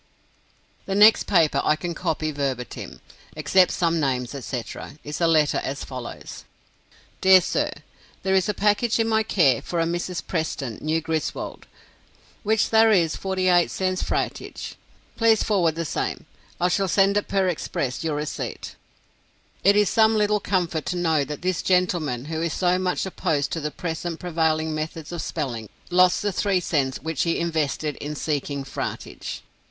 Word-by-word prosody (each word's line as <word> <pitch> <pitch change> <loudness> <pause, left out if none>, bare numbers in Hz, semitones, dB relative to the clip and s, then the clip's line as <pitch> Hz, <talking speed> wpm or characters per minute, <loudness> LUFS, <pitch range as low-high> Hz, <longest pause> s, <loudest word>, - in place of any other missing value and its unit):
The 195 - -1
next 210 +2 +6
paper 165 -6 +3
I 150 - +3
can 170 +2 -4
copy 160 -2 -2
verbatim, 135 -4 -4 0.3
except 185 -1 +4
some 170 -2 +1
names, 130 -3 -1
etc., 130 +1 -6
is 150 +3 -5
a 170 - +4
letter 155 -3 +3
as 140 +2 -4
follows: 125 -2 -8 0.8
"Dear 190 0 +8
Sir 180 - -1 0.5
There 190 - +1
is 190 +1 +2
a 210 - 0
Package 210 +3 +2
in 225 - +2
My 220 -1 +3
care 155 - +3
for 170 - -3
a 165 - +2
Mrs. 175 +1 -3
preston 150 - -3
New 160 +1 0
Griswold 160 -1 -4 0.8
wich 220 0 +2
thare 225 0 +5
is 170 -6 +3
48 185 -2 +2
cts. 185 -1 -1
fratage. - - -3 0.4
Pleas 225 -2 +4
forward 180 -7 +2
the 165 0 -3
same. - - -3 0.3
I 180 - +3
shall 195 +2 +1
send 195 +2 +3
it 205 - 0
Per 195 -1 +1
Express 140 -6 -2
Your 155 -2 -1
recpt." 150 - -5 0.9
It 200 +1 +6
is 210 -1 +4
some 220 +1 +4
little 210 0 +2
comfort 175 -6 -1
to 180 - -1
know 160 -4 +2
that 150 +4 -7
this 185 -1 0
gentleman, 175 -9 +1
who 160 +1 -3
is 170 -1 -1
so 180 0 +2
much 185 0 -1
opposed 160 -6 -1
to 165 - -2
the 150 - -2
present 165 +1 -4
prevailing 160 -2 0
methods 155 +1 -5
of 170 -2 -4
spelling, 120 -9 -4 0.2
lost 180 +1 +4
the 205 - +1
three 195 0 +1
cents 140 -7 0
which 160 -2 -2
he 170 - +1
invested 155 -3 -1
in 150 +1 -5
seeking 145 -2 -2
"fratage." 135 - -5
170 Hz, 165 wpm, -24 LUFS, 150-190 Hz, 0.9 s, Dear